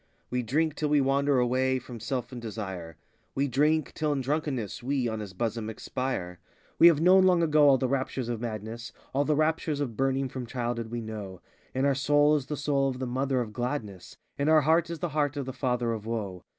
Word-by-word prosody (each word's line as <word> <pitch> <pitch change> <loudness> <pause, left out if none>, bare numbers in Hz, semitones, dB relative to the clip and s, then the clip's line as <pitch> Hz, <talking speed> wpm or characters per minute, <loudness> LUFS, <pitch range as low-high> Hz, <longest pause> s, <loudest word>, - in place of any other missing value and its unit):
We 125 0 0
drink 150 +7 0
till 150 0 -2
we 150 0 +4
wander 140 +1 +2
away 130 +1 +2
from 125 -2 -8
Self 120 +2 -3
and 125 -2 -7
Desire,— 95 -8 -6 0.4
We 140 +1 +1
drink 150 +4 +1
till 155 -1 -1
in 140 - -1
drunkenness 135 -6 -2
we, 130 0 0
on 110 -1 -3
his 100 -3 -7
bosom, 110 +1 -2
expire. 110 -6 -4 0.3
86 - - -39
We 170 - +9
have 165 -4 +5
known 185 +2 +6
long 180 -2 +4
ago 150 -2 +5
all 135 - +6
the 130 - 0
raptures 130 -1 -2
of 120 -2 -3
madness; 115 +1 -5 0.2
All 140 +2 +2
the 150 - +2
raptures 155 -1 0
of 130 -6 -3
burning 135 +1 +1
from 125 -1 -6
childhood 120 -2 -3
we 120 0 -4
know; 105 -4 -7 0.4
In 130 +1 +1
our 140 - +4
soul 145 +2 +3
is 140 -3 -2
the 150 - -3
soul 140 -1 +1
of 130 - -4
the 130 - -3
Mother 130 +1 0
of 110 -3 -5
gladness; 105 -8 -4 0.2
In 140 +2 +2
our 155 -1 +6
heart 160 +3 +3
is 170 - -4
the - - -3
heart 145 -1 0
of 140 - -2
the 130 - -5
Father 125 -3 0
of 110 -1 -6
woe. 100 -6 -4
130 Hz, 225 wpm, -28 LUFS, 115-145 Hz, 0.4 s, We